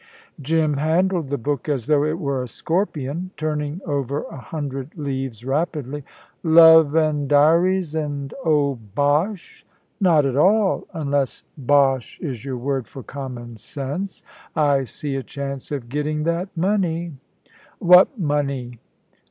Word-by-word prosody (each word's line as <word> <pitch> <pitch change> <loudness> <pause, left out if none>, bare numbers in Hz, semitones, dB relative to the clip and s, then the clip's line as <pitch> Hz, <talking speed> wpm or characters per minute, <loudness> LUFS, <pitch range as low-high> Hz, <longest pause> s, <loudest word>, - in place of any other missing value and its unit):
Jim 155 0 +1
handled 165 +1 +1
the 140 - -1
book 145 +3 -3
as 135 -6 -1
though 145 0 +3
it 155 +2 -1
were 140 -6 -2
a 125 - -5
scorpion, 165 - -2
turning 150 +1 -2
over 140 -2 -2
a - - -8
hundred 135 -1 -5
leaves 135 -5 -4
rapidly. 145 -1 -2 0.4
"Love 160 -2 +7
an' 155 -3 +2
diaries, 165 +4 +3
and 145 -3 -3
oh, 145 -5 +2 0.2
bosh!" 155 +7 0 0.4
"Not 165 -7 +4
at 135 -2 0
all, 195 +6 +3
unless 145 -6 -1
bosh 135 -2 +2
is 130 -9 -5
your 135 -2 -4
word 135 -1 -2
for 135 - -10
common 125 -4 -7
sense. 145 - -5 0.3
I 140 -3 +2
see 140 +3 -5
a - - -2
chance 140 +1 -6
of 135 -5 -4
getting 150 +3 -2
that 170 +4 -1
money." 175 -3 0 0.6
"What 180 +8 +6
money?" 140 - -2
145 Hz, 135 wpm, -22 LUFS, 135-160 Hz, 0.6 s, Love